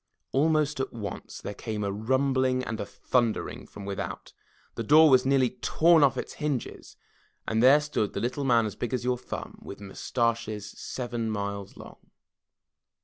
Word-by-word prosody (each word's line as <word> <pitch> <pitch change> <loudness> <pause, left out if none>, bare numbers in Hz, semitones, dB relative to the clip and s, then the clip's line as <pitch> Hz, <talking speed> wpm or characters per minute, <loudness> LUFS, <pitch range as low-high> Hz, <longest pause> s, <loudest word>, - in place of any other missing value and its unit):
Almost 150 0 +2
at 135 - -2
once 105 -5 -7
there 105 - -5
came 105 0 -4
a 100 - -1
rumbling 130 +4 +1
and 110 -3 -4
a 100 - -4
thundering 115 +2 -1
from 100 - -10
without, 100 -1 -5 0.4
the - - -4
door 155 +6 +6
was 130 0 +5
nearly 135 -3 +3
torn 160 +6 +4
off 135 -2 +3
its - - -4
hinges 145 -5 -3 0.5
and 110 0 +1
there 135 +4 +7
stood 150 -9 -2
the - - -2
Little 125 +4 -2
Man 120 -4 +4
As 105 - -4
Big 120 +1 -2
As 125 - -3
Your 125 0 +1
Thimib - - -7
With 100 - -9
Mustaches 110 0 -2
Seven 120 -3 -4
Miles 100 -2 -4
Long. - - -12
120 Hz, 165 wpm, -27 LUFS, 105-135 Hz, 0.5 s, there